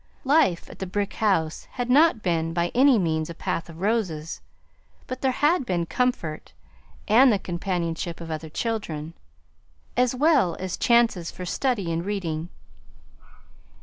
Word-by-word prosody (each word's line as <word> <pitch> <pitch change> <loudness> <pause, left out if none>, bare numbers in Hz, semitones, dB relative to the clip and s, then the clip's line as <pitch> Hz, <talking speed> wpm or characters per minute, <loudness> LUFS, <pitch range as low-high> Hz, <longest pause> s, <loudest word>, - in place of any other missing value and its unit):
Life 275 - +3
at - - -13
the 190 - -4
brick 200 +2 -2
house 175 -8 0
had 245 -1 -3
not 275 -2 +4
been 165 -2 0
by 170 0 0
any 265 0 +5
means 160 -4 0
a 170 - -7
path 165 0 -3
of 165 +1 -11
roses, 185 -8 -1 0.6
but 255 0 -6
there 265 - +2
had 325 -1 +3
been 175 -7 -1
comfort 175 -9 -2 0.5
and 245 +5 +6
the 205 - +3
companionship 170 -2 -3
of 165 -1 -7
other 155 0 -5
children, 165 -6 -3 0.8
as 250 0 +2
well 270 - +3
as 185 -1 -3
chances 230 -8 +2
for 180 - -7
study 205 -3 -1
and 165 +1 -2
reading. 175 -5 -3
185 Hz, 150 wpm, -25 LUFS, 165-245 Hz, 0.8 s, and